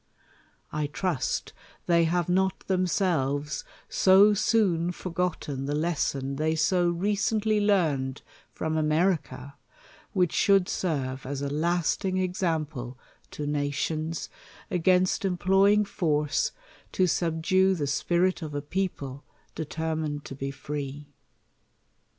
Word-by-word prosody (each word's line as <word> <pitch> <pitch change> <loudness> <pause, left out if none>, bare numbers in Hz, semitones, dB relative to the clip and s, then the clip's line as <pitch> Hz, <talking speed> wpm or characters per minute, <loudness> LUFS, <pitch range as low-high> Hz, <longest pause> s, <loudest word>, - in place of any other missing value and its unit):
1 150 -1 -1
trust 155 -3 -2 0.3
they 170 -1 +4
have 175 +1 0
not 190 +1 +1
themselves 155 -6 0 0.2
so 195 +2 +6
soon 185 -5 +2
forgotten 170 -6 -3
the 145 +1 -1
lesson 140 -4 -1
they 160 +2 +1
so 175 +2 +2
recently 210 +4 +1
learned 150 -10 +1 0.3
from 160 0 -3
America, 155 -4 0 0.6
which 180 -5 +2
should 195 -3 +4
serve 135 -9 -2
as 140 +1 -4
a 140 - -2
lasting 175 +4 0
examplelo 160 -9 -2 0.4
nations, 150 +2 -2 0.4
against 185 +1 +2
employing 195 +3 +3
force 155 -7 0 0.4
to 185 - +2
subdue 180 +3 +2
the 150 -5 -2
spirit 175 +6 +1
of 150 -2 -6
a 145 - -1
people, 145 -5 -3 0.3
determined 155 -1 -3
to - - -7
be 135 0 -4
free 145 +1 -6
165 Hz, 105 wpm, -27 LUFS, 145-185 Hz, 0.6 s, so